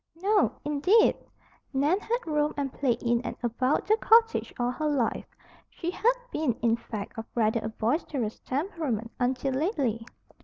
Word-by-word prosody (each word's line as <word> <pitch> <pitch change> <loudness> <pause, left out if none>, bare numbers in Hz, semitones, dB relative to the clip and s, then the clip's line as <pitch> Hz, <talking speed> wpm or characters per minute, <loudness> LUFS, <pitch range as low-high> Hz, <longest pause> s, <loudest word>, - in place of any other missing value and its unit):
No, 400 +5 +2
indeed! 330 +10 +4 0.6
Nan 290 +8 +2
had 475 +3 -2
romped 300 -2 0
and 275 -2 -2
played 250 -4 0
in 235 -1 +2
and - - -5
about 255 +4 +1
the 435 +1 +3
cottage 455 0 +4
all 245 0 +1
her 305 +4 -2
life. 275 -6 0 0.4
She 345 0 -4
had 475 +6 +2 0.2
been, 300 -6 0
in 230 -1 +2
fact, 220 -2 -7
of 225 - -5
rather 225 0 +2
a 220 - -3
boisterous 230 0 -2
temperament 270 - -3
until 260 +2 0
lately. 265 - 0
275 Hz, 155 wpm, -28 LUFS, 235-335 Hz, 0.6 s, indeed